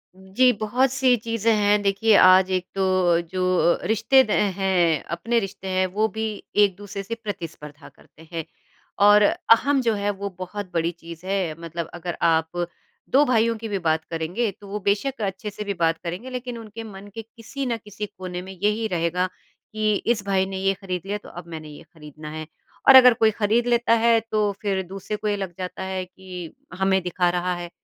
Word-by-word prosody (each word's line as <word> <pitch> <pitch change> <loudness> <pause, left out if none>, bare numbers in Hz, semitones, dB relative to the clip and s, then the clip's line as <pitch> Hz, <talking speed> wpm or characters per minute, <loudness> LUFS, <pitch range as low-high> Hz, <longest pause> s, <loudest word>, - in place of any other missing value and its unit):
जी, 195 +7 +2
बहुत-सी 255 +3 +2
चीज़ें 230 -1 +1
हैं 205 0 +3
देखिए 200 +2 +3
आज 185 0 +7
एक 185 -1 0
तो 185 -3 +2
जो 185 - -2 0.5
रिश्ते 260 +5 +4
द 215 - -5 0.3
हैं 175 -5 +2
अपने 230 +6 0
रिश्ते 195 -1 -6
हैं, 185 0 +1
वो 210 +4 0
भी 220 +2 -5 0.3
एक-दूसरे 205 0 +1
से 230 +4 -4
प्रतिस्पर्धा 165 -9 -8
करते 160 +2 -20
हैं। 165 -1 -3 0.6
और 210 0 +7
अहम 265 +6 +3
जो 230 -2 +1
है 205 0 -1
वो 200 0 -5
बहुत 185 +1 -6
बड़ी 165 0 0
चीज़ 170 0 -12
है 190 -5 -1
मतलब 165 0 -5
अगर 175 0 -5
आप 165 +1 +1 0.4
2 280 +3 +5
भाइयों 230 -2 +2
की 225 0 -6
भी 200 -2 -2
बात 160 0 +2
करेंगे। 170 +8 -1
तो 200 +2 -15
वो 210 +1 -4
बेशक 230 +5 -1
अच्छे 195 +1 -3
से 210 +1 -6
भी 200 -1 -2
बात 165 -2 +1
करेंगे 180 +9 -5
लेकिन 250 -1 -5
उनके 225 0 -8
मन 205 -2 -10
के 225 - -4
किसी 230 +5 -7
न 235 -2 -1
किसी 210 -1 -7
कोने 185 -3 -7
में 190 +1 -9
यही 210 +4 0
रहेगा 180 0 0
कि 215 +3 -4
इस 220 -1 0
भाई 190 -1 +2
ने 190 0 -5
ये 195 +1 +1
ख़रीद 185 -3 -5
लिया, 205 +1 -2
तो 210 - -14
अब 175 0 -10
मैंने 160 -2 -8
ये 145 - -12
खरीदना 150 -1 -11
है। 155 0 -6 0.4
और 270 - +10
अगर 250 -1 +9
कोई 220 -1 +3
खरीद 225 +3 +1
लेता 235 -1 +3
है 230 -1 +5
तो 210 -1 +2
फ़िर 195 -2 0
दूसरे 195 +2 -5
को 210 0 -4
ये 205 - +1
लग 190 -3 -5
जाता 185 0 -5
है 190 -1 -3
कि 180 -2 -10 0.3
हमें 190 0 +2
दिखा 180 0 +1
रहा 180 +1 -1
है। 175 0 -6
195 Hz, 195 wpm, -23 LUFS, 180-220 Hz, 0.6 s, और